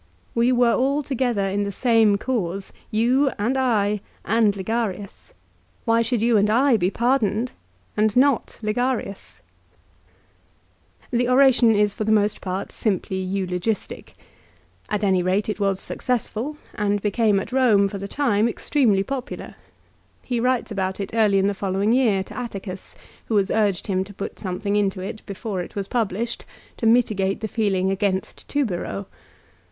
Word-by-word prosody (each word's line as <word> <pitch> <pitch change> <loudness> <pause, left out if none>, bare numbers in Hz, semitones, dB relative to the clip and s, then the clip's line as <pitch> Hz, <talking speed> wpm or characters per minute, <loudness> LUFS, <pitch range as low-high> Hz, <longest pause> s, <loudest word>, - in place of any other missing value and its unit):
We 235 +2 +3
were 245 -2 +4
all 280 +3 +1
to 275 - -4
gether 235 -6 0
in 200 +1 -1
the 200 - -3
same 225 -2 +3
cause, 200 -5 -3 0.2
you, 250 +6 +2
and 230 +6 0
I, 210 -6 +1 0.2
and 220 -2 +3
Ligarius. 205 - -4 0.5
Why 230 -1 +3
should 230 -1 0
you 235 -1 +4
and 205 +1 +3
I 250 +4 +4
be 185 -4 +2
pardoned 235 0 +1 0.4
and 215 0 +2
not 270 -1 +2
Ligarius? 220 -2 -2 1.7
The 245 0 +1
oration 255 -3 +5
is 205 0 +2
for - - -3
the 215 - 0
most 210 -1 +2
part 190 +1 -4
simply 190 -3 -1
eulogistic. 185 +2 -3 0.7
At 210 0 -1
any 190 -2 +3
rate 190 +4 0
it 210 - -3
was 195 -2 +1
successful, 250 +3 -2 0.2
and 205 -1 0
became 210 0 +2
at 195 - -6
Eome, 235 -6 +4
for 195 0 -6
the 200 - -5
time, 230 -3 +1
extremely 225 -6 +1
popular. 265 +2 -5 0.7
He 245 -2 -2
writes 250 -1 0
about 190 -1 -2
it 200 +1 -5
early 215 -3 +3
in 195 - +3
the 200 - +1
following 195 +2 0
year, 225 -7 +3
to - - -12
Atticus, 195 -6 -6 0.3
who 220 - +1
has 200 -1 +1
urged 205 -4 +1
him 190 -2 0
to 200 0 -13
put 195 - -6
something 200 +1 -2
into 200 -2 +1
it, 195 +3 -6
before 200 -1 -4
it - - -9
was 200 -1 -3
published, 230 0 -2 0.3
to 225 - 0
mitigate 215 -5 +2
the 220 - -2
feeling 195 -4 0
against 195 -1 -2
Tubero. 200 -7 -2
210 Hz, 160 wpm, -23 LUFS, 195-240 Hz, 1.7 s, oration